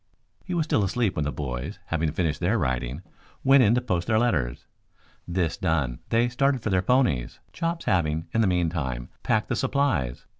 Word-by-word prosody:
He 180 - -4
was 165 - +2
still 110 -9 +2
asleep 105 +1 0
when 75 - -1
the 75 - -1
boys, 70 +7 -4
having 80 -2 -1
finished 80 -2 -1
their 95 +7 +1
writing, 65 - -2 0.4
went 135 0 +6
in 115 -1 +4
to 125 - +1
post 90 -8 -1
their 110 - +3
letters. 75 - 0 0.6
This 85 -2 -1
done 70 -7 0
they 115 +1 +3
started 130 0 +1
for 110 - -1
their 95 -1 +3
ponies, 95 - +1
Chops 165 0 -2
having, 80 -3 +1
in 115 - +3
the 110 - +3
meantime, 80 -9 -1
packed - - +1
the - - 0
supplies. 90 - 0
90 Hz, 185 wpm, -26 LUFS, 75-120 Hz, 0.6 s, went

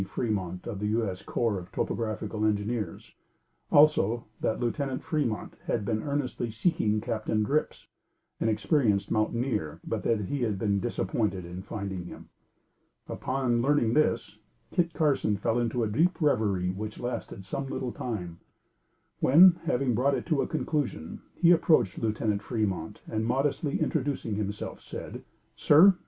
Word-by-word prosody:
Fremont 95 -5 -3
of 105 -5 -5
the 105 - -1
U.S. 105 -4 -1
corps 115 -5 -1
of 90 - -12
topographical 110 -1 -2
engineers; 105 -2 -1 0.6
also, 120 -6 +4
that 110 - -1
Lieutenant 130 +2 -2
Fremont 145 -9 -2
had 110 -3 0
been 110 +1 0
earnestly 140 -5 -2
seeking 110 - +1
Captain 110 -1 -1
Drips, 145 +8 -1 0.5
an 110 - +1
experienced 105 -1 +1
mountaineer, 110 - 0
but, - - -2
that 115 -2 +1
he 135 +7 -3
had 110 -4 0
been 100 0 +1
disappointed 95 -1 -1
in 90 +2 -7
finding 95 -3 -5
him. - - -11 0.8
Upon 130 -3 0
learning 125 -4 +2
this, 155 +3 +1 0.3
Kit 170 -2 +1
Carson 140 -10 +1
fell 115 +3 0
into 120 0 0
a - - +1
deep 165 - +1
reverie 105 - +2
which 105 +3 -6
lasted 120 -5 -5
some 135 +8 -4
little 125 -2 -3
time, 90 -10 -5 0.8
when, 170 +6 +7
having 125 -2 +1
brought 135 +5 +2
it - - -4
to 155 -4 +1
a - - -1
conclusion, 140 - -2
he 170 -1 +5
approached 155 - +3
Lieutenant 110 -2 0
Fremont 105 -5 -2
and 110 0 -2
modestly 140 +5 0
introducing 140 -7 -1
himself, 105 0 -4
said: - - -7 0.3
"Sir! 175 +5 +6
115 Hz, 145 wpm, -28 LUFS, 105-135 Hz, 0.8 s, when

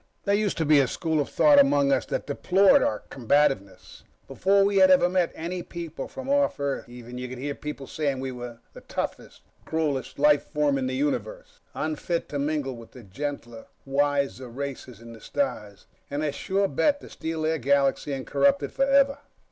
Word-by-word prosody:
There 200 - +1
used 205 -1 0
to 160 - 0
be 150 -1 +5
a 135 - +3
school 160 +3 -1
of 140 - -4
thought 290 -1 +5
among 145 - +4
us - - +1
that - - -3
deplored 185 +7 +4
our 105 - -1
combativeness; 135 -5 0 0.3
before 195 +1 +3
we 200 0 +1
had 190 -1 +7
ever 180 -1 +6
met 180 -1 +1
any 175 +2 -4
people 170 -2 -7
from 265 0 -8
off 280 - +1
Earth, 140 -3 -3
even, 120 0 -9
you 125 0 -5
could 130 - -7
hear 140 +3 -3
people 150 -1 -7
saying 140 -2 -2
we 130 0 -4
were 120 -2 -8 0.3
toughest, - - -5 0.2
cruelest 145 -6 -2
life 150 0 +4
form 150 -3 0
in 130 - -1
the 130 - -2
Universe, 130 -6 -3 0.2
unfit 160 +2 -2
to 145 - -3
mingle 145 -2 -2
with 115 -1 -13
the 125 - -12
gentler 120 +2 -6 0.2
wiser 140 -1 0
races 130 -2 -7
in 115 0 -11
the 115 - -13
stars, 105 - -3 0.2
and 145 +2 -2
a 150 - 0
sure 195 +6 0
bet 285 - +1
to - - -11
steal 160 -1 -5
their 160 0 0
galaxy 140 +2 +1
and 135 -1 -4
corrupt 280 0 +2
it - - -4
forever. 275 +1 +3
145 Hz, 190 wpm, -26 LUFS, 130-175 Hz, 0.3 s, had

